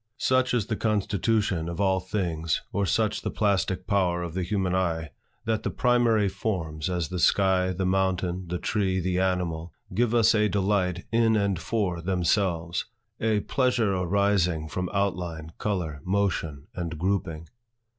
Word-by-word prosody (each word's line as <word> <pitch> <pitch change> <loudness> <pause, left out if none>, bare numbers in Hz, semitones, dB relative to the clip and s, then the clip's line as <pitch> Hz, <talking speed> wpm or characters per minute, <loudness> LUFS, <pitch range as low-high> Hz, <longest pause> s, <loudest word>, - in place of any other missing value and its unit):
Such 130 -1 +2
is 115 -5 +1
the 110 - -2
constitution 105 -4 0
of 85 - -6
all 95 -2 +2
things, 85 -4 -2
or 100 -1 0
such 110 +2 +1
the - - -2
plastic 95 -3 0
power 90 -3 +1
of 85 -2 -5
the 95 - -2
human 95 0 -1
eye, 85 -4 -1 0.3
that 110 -1 0
the - - -2
primary 120 -4 +3
forms, 85 -7 -3
as 90 -3 -1
the 90 -1 -3
sky, 95 0 +3
the 95 +1 -2
mountain, 95 -1 0
the 90 +1 -2
tree, 95 0 0
the 90 0 0
animal, 90 -3 -1 0.2
give 120 +3 +1
us 115 -1 +5
a 105 -1 +3
delight 95 -3 0
in 115 -1 +3
and 100 -4 +1
for 90 -3 -1
themselves; 90 -1 0 0.3
a 110 -2 +1
pleasure 125 -6 +1
arising 90 -3 +1
from 90 +3 -3
outline, 90 -5 -2
color, 85 -8 -2
motion, 90 -7 -1
and 85 -2 -4
grouping. 85 -3 -2
95 Hz, 155 wpm, -26 LUFS, 85-105 Hz, 0.3 s, us